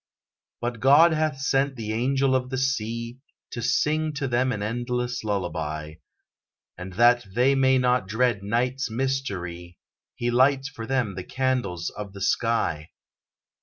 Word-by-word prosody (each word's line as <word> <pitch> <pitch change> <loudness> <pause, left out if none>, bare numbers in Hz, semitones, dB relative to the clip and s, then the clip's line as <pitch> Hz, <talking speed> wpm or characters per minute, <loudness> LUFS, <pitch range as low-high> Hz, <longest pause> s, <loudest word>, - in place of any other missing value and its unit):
But 120 -1 -3
God 145 +7 +6
hath 155 -3 0
sent 135 0 +1
the 110 -3 -4
angel 135 +3 +1
of 125 -1 -1
the 130 - -3
sea 115 -2 -2 0.3
To 120 - -5
sing 155 +6 +1
to 140 -1 -2
them 125 +1 +1
an 105 -4 -3
endless 125 +2 -2
lullaby; 80 -6 -3 0.8
And 90 +1 -8
that 120 +4 +4
they 125 +3 +4
may 130 -1 +4
not 125 -5 +1
dread 110 0 +1
night's 125 +6 -1
mystery, 100 -9 -3 0.4
He 120 0 -1
lights 135 +2 +3
for 115 -6 -8
them 125 -6 0
the 90 0 -6
candles 125 -11 -2
of 105 -2 -8
the 100 - -10
sky. 100 -7 0
120 Hz, 145 wpm, -25 LUFS, 105-135 Hz, 0.8 s, God